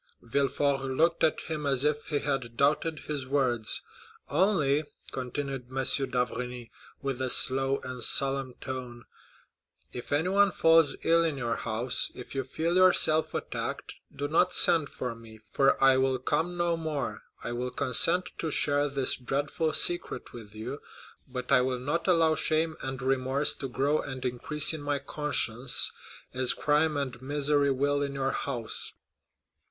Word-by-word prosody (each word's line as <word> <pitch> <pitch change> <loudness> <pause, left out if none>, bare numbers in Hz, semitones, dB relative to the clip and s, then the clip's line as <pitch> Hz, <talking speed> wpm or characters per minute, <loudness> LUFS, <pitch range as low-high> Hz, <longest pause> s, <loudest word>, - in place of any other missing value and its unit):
Villefort 140 +3 0
looked 155 +6 0
at 155 - +2
him 155 -2 -5
as 135 -1 +1
if 150 0 -1
he 150 - -1
had 135 -5 -3
doubted 155 +2 0
his 140 -4 -5
words. 130 -5 0 0.5
"Only," 155 -7 +1 0.3
continued 135 0 -5
M. 135 +1 -3 0.3
d'Avrigny, 125 -1 -4 0.3
with 135 -2 -3
a 130 - -1
slow 135 +2 +5
and 125 -2 -3
solemn 135 -1 +3
tone, 125 -3 -7 0.9
"if 120 - -8
anyone 185 +7 +2
falls 165 -4 +4
ill 165 0 +3
in 160 -4 -2
your 120 -3 -2
house, 115 +2 0
if 125 - -10
you 135 -1 -2
feel 165 +7 -2
yourself 175 -4 +4
attacked, - - -5 0.2
do 145 - -5
not 175 +4 +1
send 165 -5 +4
for 125 -2 -5
me, 115 -1 -14
for 135 - +2
I 135 -1 +5
will 130 0 +1
come 160 +7 -2
no 175 -1 0
more. 150 -9 -4 0.2
I - - -4
will 125 +1 -3
consent 165 +8 +3
to 160 - -2
share 145 0 +1
this 135 -1 +1
dreadful 145 +5 -2
secret 175 +2 +2
with 110 -3 -12
you, 125 +7 -7 0.5
but 125 0 -7
I 130 -2 +5
will 130 0 -1
not 150 +8 -3
allow 165 -3 +3
shame 155 0 0
and 130 0 -5
remorse 135 +2 +1
to 135 - -5
grow 140 +4 0
and 130 -2 -7
increase 140 +5 +2
in 155 - -6
my 145 0 -2
conscience, 135 -4 +1 0.4
as 130 -1 +3
crime 150 +1 +1
and 130 -3 -4
misery 145 +1 +1
will 140 +2 0
in 140 -1 -3
your 135 0 -1
house." 120 -5 -2
140 Hz, 155 wpm, -28 LUFS, 130-150 Hz, 0.9 s, slow